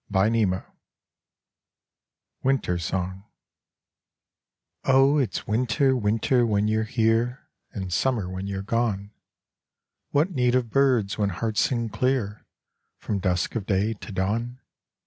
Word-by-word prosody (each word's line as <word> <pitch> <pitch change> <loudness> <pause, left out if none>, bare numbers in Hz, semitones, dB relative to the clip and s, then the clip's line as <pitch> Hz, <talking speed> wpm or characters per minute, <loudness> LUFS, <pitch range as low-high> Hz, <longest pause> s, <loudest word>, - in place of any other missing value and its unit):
XVIII 100 -1 +2 1.8
Winter 130 -10 +1
Song 95 +3 -3 1.6
Oh, 135 +2 +4
it's 125 -8 -2
winter, 125 +4 +2
winter, 115 +2 +2
when 105 -2 +1
you're 110 0 +1
here, 115 +2 0 0.2
And 95 -4 -5
summer 115 -3 +1
when 95 +1 -5
you're 95 -1 -4
gone. 105 -2 -1 1.0
What 155 +6 +2
need 125 -5 +2
of 120 -3 0
birds 125 -8 +2
when 100 -1 +2
hearts 105 +4 -1
sing 115 -3 0
clear, 120 -4 -1 0.5
From 100 - -3
dusk 90 -1 0
of 105 -4 -3
day 100 +3 +1
to 110 - -10
dawn? 115 +6 -2
110 Hz, 115 wpm, -25 LUFS, 100-125 Hz, 1.8 s, Oh